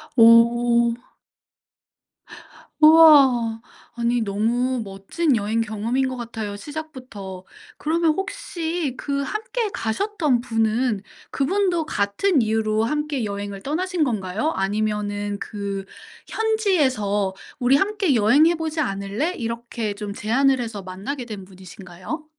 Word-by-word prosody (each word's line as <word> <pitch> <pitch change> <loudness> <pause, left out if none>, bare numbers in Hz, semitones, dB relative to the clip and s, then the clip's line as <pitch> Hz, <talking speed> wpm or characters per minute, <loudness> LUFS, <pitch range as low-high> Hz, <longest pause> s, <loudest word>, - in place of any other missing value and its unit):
오. 235 0 +5 1.9
우와. 275 -8 +6 0.3
아니 235 0 0
너무 230 +4 0
멋진 205 - -1
여행 215 +2 -1
경험인 225 +4 -1
것 255 - -5
같아요 225 -3 -5
시작부터. 255 -10 -8 0.3
그러면 325 +1 +1
혹시 340 - -3
그 280 -1 -2
함께 435 - -3
가셨던 290 - 0
분은 225 -2 0 0.3
그분도 350 +3 0
같은 255 - +1
이유로 220 0 +1
함께 295 0 -1
여행을 200 -1 -5
떠나신 345 - -1
건가요? 215 - -1
아니면은 205 0 -2
그 200 -2 -5 0.4
현지에서 270 - +1 0.3
"우리 250 +2 +4
함께 390 -5 +1
여행해 285 +11 +4
보지 320 -1 -3
않을래?" 200 - -2
이렇게 230 - -4
좀 205 0 -6
제안을 260 +6 +2
해서 225 -4 -4
만나게 195 +9 -6
된 205 -5 -8
분이신가요? 190 - -9
235 Hz, 250 characters per minute, -22 LUFS, 205-305 Hz, 1.9 s, 우와